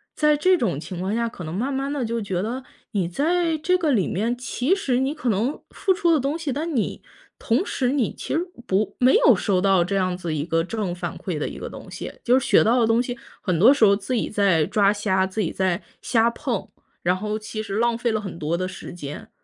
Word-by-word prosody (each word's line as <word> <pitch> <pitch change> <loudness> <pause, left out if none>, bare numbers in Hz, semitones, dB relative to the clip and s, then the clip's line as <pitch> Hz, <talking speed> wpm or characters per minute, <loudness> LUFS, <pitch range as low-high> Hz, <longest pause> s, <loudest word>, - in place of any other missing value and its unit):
在 300 -1 +4
这 370 +5 +3
种 225 - -1
情 175 +1 -7
况 190 +3 -2
下， 235 0 0
可 180 - -9
能 155 - -5
慢 240 +9 -1
慢 275 +1 -2
地 280 - -1
就 230 0 -2
觉 190 -3 -2
得 245 +5 -3 0.3
你 195 -5 0
在 325 - +1
这 360 +4 +2
个 320 -5 +1
里 205 -7 +2
面， 230 +6 -1
其 250 +6 0
实 260 -11 0
你 270 +2 0
可 280 -6 -2
能 225 +8 0
付 380 - +1
出 355 -3 +2
的 315 - +4
东 275 +4 -1
西， 315 -4 -3
但 310 +4 -3
你 225 - -1 0.4
同 245 +11 +1
时 255 -2 0
你 270 -6 0
其 - - -5
实 315 - +2 0.3
不 200 +1 0
没 255 +1 +5
有 245 - +6
收 185 -1 +1
到 195 -3 +4
这 195 - -2
样 185 -2 0
子 170 -3 -4
一 145 - -1
个 165 -1 +1
正 200 -3 -3
反 175 -1 -5
馈 175 -5 -4
的 150 - -2
一 - - -7
个 - - -6
东 - - -10
西， - - -6
就 250 +2 +5
是 265 - -1
学 - - +6
到 240 +3 +3
的 225 - +3
东 230 +1 +3
西， 245 -1 -4 0.2
很 180 -3 0
多 240 +10 +8
时 235 -6 +4
候 200 - +5
自 205 +5 -4
己 230 - -1
在 195 -7 +3
抓 200 +2 +3
瞎， 190 -2 +1
自 190 +3 -5
己 170 - -1
在 185 0 0 0.2
瞎 230 -1 +3
碰， 235 -2 -3 0.4
然 180 +1 +2
后 210 +3 -3
其 215 0 -5
实 200 -2 -5
浪 235 0 +2
费 235 -1 0
了 215 - 0
很 195 -5 -7
多 160 +2 -1
的 185 +1 -2
时 190 - -8
间。 150 -4 -8
220 Hz, 270 characters per minute, -23 LUFS, 190-265 Hz, 0.4 s, 多